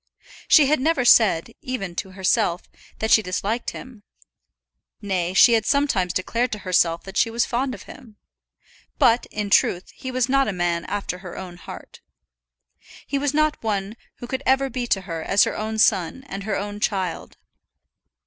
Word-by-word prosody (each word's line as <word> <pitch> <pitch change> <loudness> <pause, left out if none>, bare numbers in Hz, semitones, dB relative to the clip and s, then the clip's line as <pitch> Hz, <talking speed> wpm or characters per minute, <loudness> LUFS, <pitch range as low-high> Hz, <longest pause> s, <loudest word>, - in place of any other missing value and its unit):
She 300 - +7
had 300 +1 +2
never 275 -2 +1
said, 220 -5 +5
even 220 -9 -4
to 190 -2 -5
herself, 190 -1 0 0.3
that 220 - -2
she 220 - +7
disliked 205 +5 -2
him; 250 -5 -11 1.0
nay, 185 -3 -2
she 235 - +7
had 225 -2 +3
sometimes 260 -11 +1
declared 230 +7 -1
to - - -3
herself 170 -2 +2
that 195 +1 -8
she - - +3
was 230 +1 0
fond 255 +2 -2
of - - -12
him. 225 -6 -14 0.8
But, 235 0 +3
in 210 -1 -5
truth, 180 -1 +2
he 260 - -8
was 255 -1 0
not 275 0 +2
a 210 - -2
man 175 -1 -1
after 200 -3 -4
her 180 -2 -9
own 180 -2 -8
heart. - - -11 1.0
He 280 - -2
was 290 0 -1
not 305 0 +1
one 205 -1 -2 0.2
who - - -9
could 260 +2 -4
ever 270 0 +2
be 245 0 -3
to 195 - +1
her 165 -4 -6
as 195 +5 +3
her - - -1
own 220 +1 -4
son 210 +3 +2
and 195 -5 -7
her 215 - -1
own 205 +1 -5
child. 190 -5 -3
215 Hz, 175 wpm, -23 LUFS, 190-255 Hz, 1.0 s, She